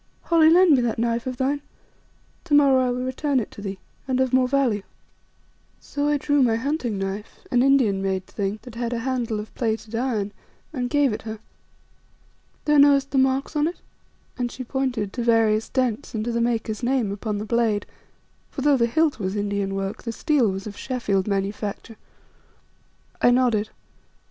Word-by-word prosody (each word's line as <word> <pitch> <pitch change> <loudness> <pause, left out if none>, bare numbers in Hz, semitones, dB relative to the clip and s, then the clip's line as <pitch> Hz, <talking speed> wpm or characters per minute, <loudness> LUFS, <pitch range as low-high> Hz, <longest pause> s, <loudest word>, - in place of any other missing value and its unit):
"Holly, 325 -2 +5
lend 355 +1 +6
me 255 - +2
that 235 -2 -1
knife 235 +1 -1
of 255 -1 -4
thine, 280 +3 0 0.8
to 300 -4 +2
morrow 270 -3 +5
I - - 0
will 250 +1 -2
return 265 +1 0
it 225 - -5
to - - -10
thee, 195 -1 -5 0.3
and 260 -1 0
of 260 -1 +1
more 255 -1 +4
value." 250 -6 +1 1.0
So 290 0 -3
I 295 0 +2
drew 290 0 +1
my 235 -3 +3
hunting 250 -3 -2
knife, 195 +2 -5
an 245 - +4
Indian 255 -8 +3
made 190 -1 -1
thing, 200 +1 -3
that 245 - -11
had 235 +1 -3
a - - -1
handle 240 -5 -1
of 210 - -8
plated 220 -2 -2
iron, 225 -4 -1 0.4
and 250 -4 -2
gave 285 -4 +2
it - - -5
her. 220 0 -6 1.3
"Thou 295 -1 +4
knowest 280 -1 +5
the 270 - +2
marks 265 +3 +1
on 295 +1 +2
it," 345 - -4 0.6
and 245 -1 -1
she 255 - -6
pointed 250 -6 -2
to 240 - -3
various 225 -2 +2
dents 250 -4 -1
and 215 0 -2
to 240 - -1
the 235 0 0
maker's 225 -2 -1
name 245 -4 0
upon 210 +1 -3
the 210 - -4
blade; 220 -3 +1 0.6
for - - -6
though 285 0 +4
the 235 -1 +2
hilt 315 +3 +1
was 190 0 -2
Indian 200 -1 -1
work 195 +1 -3
the 230 - -4
steel 255 -1 +2
was 195 0 -4
of 210 -1 -7
Sheffield 205 -7 -1
manufacture. 205 +2 -3 1.2
I - - +6
nodded. 240 -4 +2
240 Hz, 185 wpm, -24 LUFS, 210-265 Hz, 1.3 s, lend